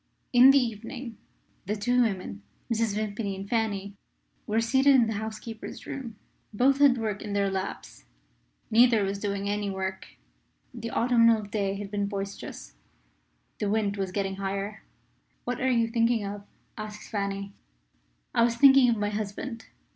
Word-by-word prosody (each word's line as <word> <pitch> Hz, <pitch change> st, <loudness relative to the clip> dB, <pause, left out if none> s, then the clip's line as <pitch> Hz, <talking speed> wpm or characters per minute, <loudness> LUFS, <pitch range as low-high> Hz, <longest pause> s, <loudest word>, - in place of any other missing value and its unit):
In 250 Hz, +2 st, +8 dB
the 275 Hz, -, +7 dB
evening, 235 Hz, 0 st, -3 dB, 0.5 s
the 210 Hz, -, 0 dB
two 245 Hz, +4 st, +2 dB
women 185 Hz, -, -2 dB, 0.3 s
Mrs. 225 Hz, -2 st, 0 dB
Vimpany 210 Hz, -1 st, -2 dB
and 195 Hz, +1 st, -7 dB
Fanny 205 Hz, -3 st, -1 dB, 0.5 s
were 215 Hz, +2 st, +1 dB
seated 265 Hz, +4 st, +4 dB
in 245 Hz, -3 st, +5 dB
the 225 Hz, -, -2 dB
housekeeper's 220 Hz, 0 st, -7 dB
room. 245 Hz, -5 st, -6 dB, 0.4 s
Both 265 Hz, +6 st, +3 dB
had 280 Hz, -3 st, +6 dB
work 215 Hz, -3 st, -3 dB
in 210 Hz, -2 st, -5 dB
their 200 Hz, -1 st, +1 dB
laps: 190 Hz, -, -5 dB, 0.7 s
neither 230 Hz, -1 st, +5 dB
was 195 Hz, +1 st, -2 dB
doing 200 Hz, -1 st, -2 dB
any 205 Hz, 0 st, -1 dB
work. 190 Hz, 0 st, -4 dB, 0.7 s
The 230 Hz, -1 st, -6 dB
autumnal 230 Hz, -2 st, +4 dB
day 200 Hz, -1 st, -2 dB
had 200 Hz, 0 st, -6 dB
been 205 Hz, -1 st, -1 dB
boisterous; 200 Hz, -, -6 dB, 0.9 s
the 205 Hz, -, -1 dB
wind 205 Hz, -1 st, 0 dB
was 195 Hz, -2 st, -3 dB
getting 195 Hz, 0 st, -2 dB
higher. 195 Hz, +2 st, -4 dB, 0.6 s
"What 245 Hz, +1 st, -3 dB
are 260 Hz, -, +2 dB
you 230 Hz, -2 st, +2 dB
thinking 230 Hz, -1 st, +1 dB
of?" 200 Hz, 0 st, -7 dB, 0.3 s
asked 210 Hz, -1 st, -7 dB
Fanny. 200 Hz, -1 st, -3 dB, 0.8 s
"I -, -, +3 dB
was 235 Hz, 0 st, +3 dB
thinking 270 Hz, 0 st, +7 dB
of 230 Hz, -, +2 dB
my 205 Hz, 0 st, 0 dB
husband. 220 Hz, +3 st, -5 dB
215 Hz, 155 wpm, -27 LUFS, 200-235 Hz, 0.9 s, In